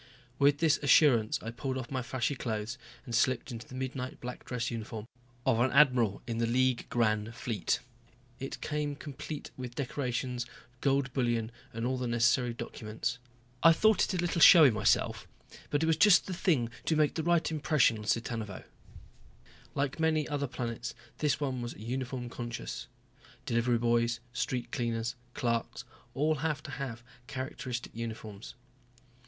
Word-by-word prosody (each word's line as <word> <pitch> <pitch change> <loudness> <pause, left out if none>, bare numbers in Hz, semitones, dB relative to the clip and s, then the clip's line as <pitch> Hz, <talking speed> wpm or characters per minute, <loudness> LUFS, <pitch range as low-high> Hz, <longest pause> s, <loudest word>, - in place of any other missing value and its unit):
With 145 0 +5
this 155 -1 +3
assurance 140 -6 +5
I 115 - -4
pulled 130 +2 -3
off 130 -1 -6
my 130 -1 -1
flashy 130 +1 -1
clothes 115 -2 -3 0.3
and 120 - -7
slipped 125 +2 +1
into 115 0 -7
the 130 - -10
midnight 130 0 -4
black 125 0 -7
dress 125 -1 -3
uniform 110 -1 -5 0.4
of 115 - +3
an 130 +2 +3
admiral 125 -8 +4
in 115 -1 -3
the 115 - +2
League 125 +1 +2
Grand 110 -3 +1
Fleet. 110 -7 -1 0.6
It 135 - -5
came 150 -1 -2
complete 145 +1 -7
with 125 -2 -6
decorations, 125 -2 -2 0.3
gold 135 -2 +1
bullion, 120 -3 0 0.2
and 115 +1 -3
all 130 +1 0
the 125 - -2
necessary 120 +1 +3
documents. 115 +1 -4 0.4
I 165 +1 +8
thought 215 +4 +4
it 190 - 0
a - - 0
little 175 -1 0
showy 155 -7 +10
myself, 110 - +1 0.4
but 145 +2 +1
it - - +3
was 160 -1 +3
just 195 +2 +6
the 190 - -4
thing 155 - +1
to 160 - +2
make 150 -1 +3
the 160 - -2
right 170 0 +2
impression 145 -6 +3
on 105 - -8
Cittanuvo. 115 -3 -2 1.1
Like 140 +2 -1
many 160 -2 +2
other 145 -1 -1
planets, 120 -2 -4 0.2
this 150 -2 +1
one 130 -4 -2
was 120 0 -5
uniform 125 +2 -4
conscious. 120 - -5 0.6
Delivery 120 +1 +2
boys, 120 0 +2
street 125 -2 -2
cleaners, 115 -1 -1 0.2
clerks 115 0 -1 0.3
all 150 +3 +2
had 155 +1 0
to 145 - -7
have 130 -5 -5 0.2
characteristic 130 -2 -5
uniforms. 110 -3 -6
125 Hz, 160 wpm, -31 LUFS, 115-145 Hz, 1.1 s, showy